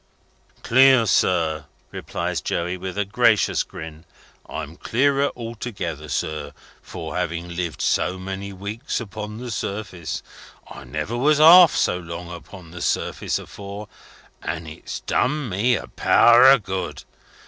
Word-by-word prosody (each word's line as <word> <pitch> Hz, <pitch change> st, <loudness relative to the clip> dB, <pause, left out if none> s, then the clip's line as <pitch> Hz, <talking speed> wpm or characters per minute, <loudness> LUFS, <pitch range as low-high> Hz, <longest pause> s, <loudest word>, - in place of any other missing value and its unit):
"Clear, 130 Hz, -1 st, +6 dB
sir," 80 Hz, -7 st, +1 dB, 0.3 s
replies -, -, -4 dB
Joey, 90 Hz, +2 st, -2 dB
with 95 Hz, +1 st, -6 dB
a 105 Hz, -, 0 dB
gracious 110 Hz, +1 st, +2 dB
grin. 80 Hz, 0 st, -9 dB, 0.5 s
"I'm 80 Hz, 0 st, -6 dB
clearer 140 Hz, +7 st, +1 dB
altogether, 105 Hz, -, -6 dB
sir, 75 Hz, 0 st, -3 dB, 0.3 s
for -, -, -7 dB
having 85 Hz, +1 st, -3 dB
lived 85 Hz, -2 st, -3 dB
so 95 Hz, -, +1 dB
many 95 Hz, +1 st, -6 dB
weeks 100 Hz, +7 st, -4 dB
upon 105 Hz, -1 st, -7 dB
the 125 Hz, 0 st, -6 dB
surface. 100 Hz, -5 st, -4 dB, 0.4 s
I -, -, -11 dB
never 75 Hz, -, -4 dB
was 145 Hz, +5 st, +3 dB
half 170 Hz, +2 st, +8 dB
so 90 Hz, -, +1 dB
long 85 Hz, 0 st, -8 dB
upon 85 Hz, -1 st, -11 dB
the 90 Hz, +1 st, -9 dB
surface -, -, -1 dB
afore, 100 Hz, +1 st, -9 dB, 0.5 s
and 80 Hz, 0 st, -4 dB
it's 80 Hz, -, -7 dB
done 150 Hz, 0 st, 0 dB
me 110 Hz, +5 st, +1 dB
a -, -, -5 dB
power 120 Hz, +2 st, +6 dB
of 135 Hz, -5 st, +5 dB
good. 95 Hz, -2 st, -4 dB
100 Hz, 135 wpm, -22 LUFS, 85-120 Hz, 0.5 s, half